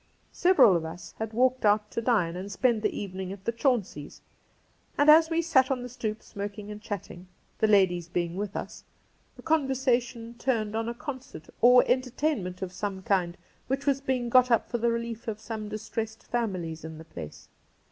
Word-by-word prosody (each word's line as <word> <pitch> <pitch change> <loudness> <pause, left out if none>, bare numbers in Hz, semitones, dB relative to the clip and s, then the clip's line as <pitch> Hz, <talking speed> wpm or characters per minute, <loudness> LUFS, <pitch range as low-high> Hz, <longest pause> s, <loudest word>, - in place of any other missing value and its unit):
Several 280 - +5
of 170 - 0
us 165 +3 -8
had 220 0 -3
walked 255 +3 +2
out 210 0 +3
to 230 - -2
dine 205 -9 +1
and 190 +3 -6
spend 235 +1 +1
the - - -1
evening 190 -1 -5
a,t 195 -1 -9
the - - +1
Chaunceys', 230 - -1 0.8
and 290 +1 +7
as 320 +1 +6
we 335 0 +1
sat 265 -6 +3
on 255 -2 -1
the - - -5
stoep 220 -3 -4
smoking 205 0 -6
and 210 0 -8
chatting, 185 -3 -7 0.3
the 220 - +3
ladies 185 -5 +3
being 175 0 -1
Cassidy 170 - -8
1 205 - -1
37 200 - -4
with - - -13
us, - - -14 0.5
the - - -12
conversation 255 -6 0
turned 220 -5 0
on 225 +1 -1
a 235 - -5
concert 260 - -8
or 250 +1 +7
entertainment 250 - -1
of 180 -1 -5
some 195 -1 -4
kind 180 -3 0 0.3
which 270 +2 -2
was 275 -1 +2
being 255 -3 -1
got 255 +1 +5
up 230 - +2
for 240 - -1
the 235 +1 +2
relief 230 -1 -4
af 215 -1 -3
some 220 -1 -6
distressed 220 +1 -5
families 185 -9 -3
in 160 0 -7
the 160 - -11
place. 80 - -10
220 Hz, 200 wpm, -28 LUFS, 195-250 Hz, 0.8 s, and